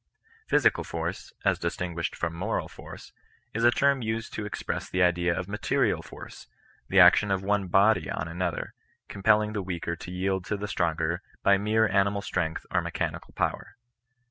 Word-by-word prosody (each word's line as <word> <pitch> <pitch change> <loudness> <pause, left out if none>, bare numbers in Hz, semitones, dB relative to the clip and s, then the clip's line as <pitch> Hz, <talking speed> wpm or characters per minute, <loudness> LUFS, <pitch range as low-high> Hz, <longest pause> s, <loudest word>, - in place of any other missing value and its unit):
Physical - - +3
force, - - -5
as - - +2
distinguished 85 -1 -3
from 85 -1 -2
moral 100 +7 -2
iaiQey - - -11 0.4
is 115 - -1
a 120 - +7
term 140 +2 +2
used 110 0 -3
to 105 - -4
express - - -4
the 90 0 +2
idea 90 0 +2
of 90 - -3
material 105 0 0
force, - - -11 0.4
the - - +4
action 105 - +7
of 95 -1 0
one 100 -1 0
body 100 +4 +3
on 80 - -3
another, 85 +1 -3 0.3
compelling 105 +1 +2
the 105 - -2
weaker 85 -2 -3
to 85 - -10
yield 95 +1 -1
to 105 - -2
the 105 +1 -4
stronger 85 -2 -1 0.2
by 100 - +6
mere 110 +2 +2
animal 100 +1 +1
strength 80 -5 -2
or - - +2
mechanical - - -4
power. 100 - -2
95 Hz, 170 wpm, -27 LUFS, 85-105 Hz, 0.4 s, a